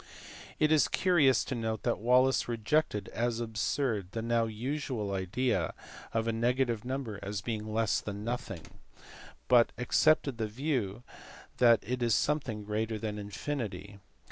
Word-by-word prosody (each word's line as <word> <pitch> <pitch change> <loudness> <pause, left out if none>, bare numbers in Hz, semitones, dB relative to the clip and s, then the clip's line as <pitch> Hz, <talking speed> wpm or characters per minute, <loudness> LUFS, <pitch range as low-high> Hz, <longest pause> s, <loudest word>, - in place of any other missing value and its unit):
It 155 0 +3
is 155 -2 +5
curious 155 -9 +3
to - - -3
note 110 -3 -3
that - - 0
Wallis 125 +4 +3
rejected 115 -2 0
as 120 0 -1
absurd 110 -2 -1
the 115 - -3
now 115 0 +2
usual 115 -2 -3
idea 95 -1 -1 0.4
of 115 0 -1
a - - +2
negative 120 -1 +1
number 125 -5 -4
as 100 0 -4
being 110 -1 -4
less 110 -1 +1
than 105 0 -6
nothing, 110 -7 -4 0.8
but 120 -1 +5
accepted 140 0 +2
the 110 - 0
view 120 -3 -2 0.5
that 120 -2 +5
it 125 +2 -3
is 115 -2 +3
something 135 -8 -1
greater 110 +1 -2
than 105 -1 -4
infinity. 100 -2 -5
115 Hz, 145 wpm, -31 LUFS, 105-125 Hz, 0.8 s, is